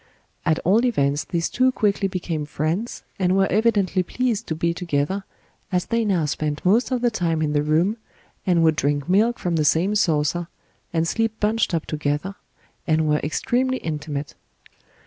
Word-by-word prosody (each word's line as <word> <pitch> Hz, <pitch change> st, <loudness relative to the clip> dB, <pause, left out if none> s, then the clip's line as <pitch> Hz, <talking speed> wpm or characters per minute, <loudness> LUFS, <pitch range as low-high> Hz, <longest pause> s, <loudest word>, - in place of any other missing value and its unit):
At 160 Hz, -1 st, +3 dB
all 210 Hz, +7 st, +4 dB
events 145 Hz, -, +1 dB
these 170 Hz, -1 st, -1 dB
two 255 Hz, +1 st, +2 dB
quickly 205 Hz, -4 st, +1 dB
became 170 Hz, -5 st, -3 dB
friends 160 Hz, -, -2 dB, 0.2 s
and 185 Hz, 0 st, +2 dB
were 195 Hz, -, +4 dB
evidently 205 Hz, -3 st, +2 dB
pleased 230 Hz, +3 st, -2 dB
to 160 Hz, -, -2 dB
be 170 Hz, +1 st, 0 dB
together, 170 Hz, +3 st, -2 dB, 0.5 s
as 180 Hz, -1 st, +1 dB
they 230 Hz, 0 st, 0 dB
now 185 Hz, -6 st, +1 dB
spent 150 Hz, +1 st, -3 dB
most 220 Hz, +7 st, +3 dB
of 255 Hz, -2 st, -1 dB
the 240 Hz, -1 st, +2 dB
time 170 Hz, -6 st, 0 dB
in 150 Hz, -1 st, 0 dB
the 145 Hz, -, +2 dB
room, 165 Hz, +9 st, +1 dB, 0.5 s
and 175 Hz, -3 st, +3 dB
would 160 Hz, -1 st, +4 dB
drink 145 Hz, -2 st, 0 dB
milk 215 Hz, +6 st, +3 dB
from 175 Hz, -2 st, -1 dB
the 155 Hz, -, +2 dB
same 165 Hz, +7 st, +2 dB
saucer, 165 Hz, -3 st, +1 dB, 0.4 s
and 165 Hz, -1 st, 0 dB
sleep 225 Hz, +3 st, -1 dB
bunched 215 Hz, -3 st, +1 dB
up 160 Hz, -, -2 dB
together, 150 Hz, +5 st, -2 dB, 0.5 s
and 155 Hz, -1 st, +2 dB
were 150 Hz, 0 st, +2 dB
extremely 260 Hz, -, 0 dB
intimate. 150 Hz, -, -4 dB
175 Hz, 170 wpm, -23 LUFS, 155-210 Hz, 0.5 s, all